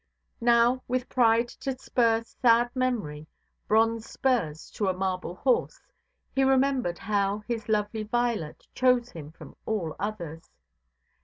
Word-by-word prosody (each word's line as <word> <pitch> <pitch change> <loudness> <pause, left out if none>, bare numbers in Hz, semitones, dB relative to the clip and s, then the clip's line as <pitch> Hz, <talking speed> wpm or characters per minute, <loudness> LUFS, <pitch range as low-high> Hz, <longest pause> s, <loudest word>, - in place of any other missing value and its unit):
Now, 240 +2 +4
with 250 0 -1
pride 235 -1 +3
to 265 -1 -3
spur 230 -3 +1
sad 240 0 +2
memory—bronze 225 +1 -1
spurs 180 - -1
to 205 - -2
a 190 - +2
marble 185 -1 -3
horse—he 270 - -2
remembered 265 -8 +2
how 200 0 -1
his 230 -3 -4
lovely 210 +1 0
Violet 225 -7 -2
chose 250 -1 +2
him 155 -2 -9
from - - -13
all 180 -8 -2
others. 175 -6 -5
225 Hz, 115 wpm, -27 LUFS, 195-245 Hz, -, Now